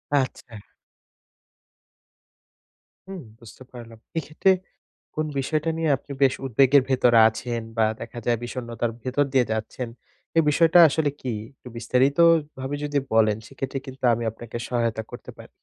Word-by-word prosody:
আচ্ছা। 130 -3 -2 2.5
হুম, 190 -3 -7 0.2
বুঝতে 115 +2 -14
পারলাম। 115 -2 -11 0.2
এইক্ষেত্রে 160 +5 +1 0.6
কোন 155 - -1
বিষয়টা 155 +4 -1
নিয়ে 165 -2 0
আপনি 140 - -14
বেশ 135 - +4
উদ্বেগের 135 +2 +4
ভেতরে 125 -3 +4
আছেন 115 +1 -4 0.2
বা 110 - +4 0.2
দেখা 115 +1 -7
যায় 120 -1 +2
বিষণ্ণতার 120 -1 -4
ভেতর 130 +3 +1
দিয়ে 130 -2 +4
যাচ্ছেন। 110 +3 -4 0.5
এই 165 - +6
বিষয়টা 165 +3 +5
আসলে 150 0 0
কি? 125 -3 -3 0.2
একটু - - -16
বিস্তারিত 125 +5 +1 0.4
ভাবে 135 +2 -3
যদি 145 -1 -1 0.2
বলেন 110 -2 +3
সেক্ষেত্রে 135 0 -5
কিন্তু 130 0 -11
আমি 115 - -2
আপনাকে 115 +1 -8
সহায়তা 115 -2 -1
করতে - - -9
পারি। - - -13
130 Hz, 140 wpm, -24 LUFS, 115-140 Hz, 2.5 s, এই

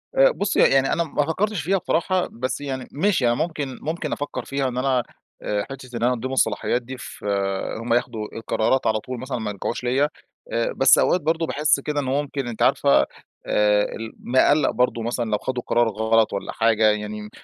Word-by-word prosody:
آآ، - - +6
بُصّي 200 0 -1
يعني 135 0 +4
أنا 170 - +1
ما 145 -2 -1
فكّرتش 200 +3 -1
فيها 195 +5 +1
بصراحة، 180 +1 0
بس 130 +4 -3
يعني 130 -3 -4
ماشي 170 -3 +1
أنا 120 - +3
ممكن 150 -4 -3
ممكن 160 0 -3
أفكّر 145 - -4
فيها 135 -1 -1
إن 125 - -4
أنا، 130 -2 +1 0.4
آآ، 105 -1 -1
حِتّة 135 -1 -9
إن 115 - -3
أنا 125 - +3
أدّيهم 130 +2 -4
الصلاحيات 120 0 +1
دي 130 +2 -8
فهُمّ 100 +2 -3
ياخدوا 115 -3 -1
القرارات 115 +3 0
على 110 0 +2
طول 125 +2 -7
مثلًا 130 0 -4
وما 110 -2 -3
يرجعوش 105 +5 -4
ليَّ، 125 +3 +1
آآ 115 -5 -4
بس 135 0 +6
أوقات 180 - +3
برضه 165 +2 0
باحس 150 -1 +2
كده 145 +1 -2
إنُّه 130 -2 -2
ممكن 140 -3 -4
أنتِ 115 - -6
عارفة، 70 -1 +4 0.5
آآ 105 0 +3
ال 115 0 -7
مقلَّق 130 +3 +3
برضو 125 -2 0
مثلًا 120 0 -2
لو 105 - +2
خدوا 125 +1 -4
قرار 120 0 +3
غلط 110 +1 +2
والّا 100 - -3
حاجة 110 -1 +2
يعني، 105 0 -5
125 Hz, 195 wpm, -23 LUFS, 115-145 Hz, 0.5 s, آآ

